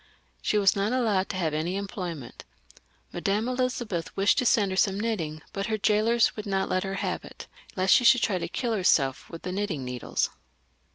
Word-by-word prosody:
She 210 - +1
was 200 -2 +4
not 200 +4 0
allowed 215 -7 +1
to - - -4
have 160 -4 -1
any 160 +4 -1
employment. 180 - -6 0.7
Madame 200 +6 0
Elizabeth 250 -8 -2
wished 195 +2 +3
to 250 - +1
send 205 -4 +3
her - - -2
some 195 0 +2
knitting, 165 -9 -3
but 195 0 -3
her 220 -1 0
jailors 220 +3 +2
would 215 -1 -6
not 195 -1 0
let 185 - 0
her 195 0 -3
have - - -2
it, - - -11 0.3
lest 185 0 +4
she 250 - +5
should 235 +1 +6
try 190 -4 +1
to - - -3
kiU 240 -3 -2
herself 155 -10 +2
with 165 - -9
the 180 - -4
knitting 185 -8 -2
needles. 125 -1 -2
195 Hz, 195 wpm, -27 LUFS, 180-220 Hz, 0.7 s, should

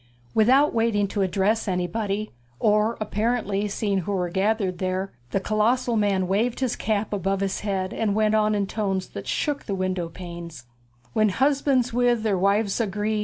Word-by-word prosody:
Without 260 +7 +4
waiting 225 -3 +2
to 205 - -2
address 195 +4 +1
anybody, 195 +3 -2 0.3
or 215 +2 +2
apparently 210 -1 -1
seeing 200 -1 -1
who 195 +3 -3
were 180 -2 -1
gathered 190 -1 0
there, 185 +1 -2 0.2
the 195 - 0
colossal 230 +4 +1
man 200 -3 +1
waved 220 +6 0
his 260 -3 0
cap 215 -1 -1
above 195 0 -1
his 195 -1 -1
head 195 -1 -2
and 210 -3 0
went 215 0 +2
on 215 -1 +3
in 200 -1 +1
tones 195 -2 -2
that - - -8
shook 295 -2 -1
the 200 - -2
window 185 -2 -2
panes: 170 -4 -9 0.5
When 215 -1 +3
hus' 275 +7 +2
bands 255 -4 +1
with' 240 -2 +2
their 210 -3 +1
wives' 200 +3 +1
agree'. 210 0 -1
205 Hz, 170 wpm, -24 LUFS, 190-225 Hz, 0.5 s, Without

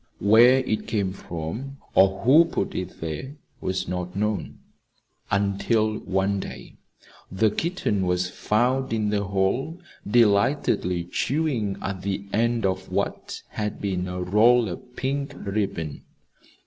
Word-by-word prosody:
Where 120 +6 +6
it 110 -3 -2
came 100 -4 -1
from, 100 - -6 0.2
or 95 0 +4
who 150 +7 +7
put - - -2
it - - -5
there 85 - -5 0.2
was 95 0 -2
not 90 0 -4
known 105 +1 -2 0.7
until 100 +2 +1
one 95 +1 0
day - - -8 0.5
the 105 +3 +2
kitten 160 - -1
was 90 0 +1
found 125 +7 0
in 110 -2 0
the 100 -1 0
hall 100 - -1 0.3
delightedly 105 -5 +2
chewing 120 - -1
at 95 -1 -3
the 100 0 -3
end 115 0 +1
of 95 -1 -2
what - - -3
had 105 -1 -4
been 95 -2 -2
a 90 0 -3
roll 110 +4 +4
of 125 +8 -9
pink 140 +2 -2
ribbon. 100 -7 -3
100 Hz, 130 wpm, -25 LUFS, 95-120 Hz, 0.7 s, who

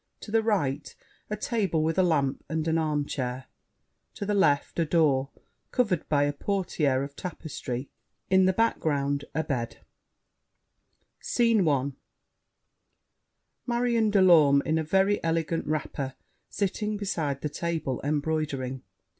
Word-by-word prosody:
To 210 - -9
the 225 0 +3
right, 160 -11 -1 0.3
a 210 - -1
table 195 -8 0
with 165 +3 0
a - - +7
lamp, 145 -6 +1
and 160 0 -1
an 165 0 +2
armchair. 140 -5 -2 0.7
To 200 - -4
the 210 - 0
left 160 -7 +2
a 165 - +3
door, 145 -5 +2 0.4
covered 205 -10 0
by 145 -2 +3
a 145 0 0
portière 150 -6 0
of 140 0 -7
tapestry. 140 -7 -5 0.4
In 190 0 +4
the 185 - +4
background 145 -10 0
a 160 - +1
bed 125 -6 -3 1.4
SCENE 230 -6 +2
I 140 -1 +1 1.8
Marion 235 -2 +2
de 200 -2 +4
Lorme, 150 -6 +6
in 160 +1 +1
a - - 0
very 195 +5 +2
elegant 165 -1 -1
wrapper, 140 -3 -3 0.3
sitting 210 +1 -2
beside 160 -9 -2
the - - -1
table, 160 -5 -3
embroidering. 145 -3 -1
160 Hz, 130 wpm, -27 LUFS, 140-190 Hz, 1.8 s, a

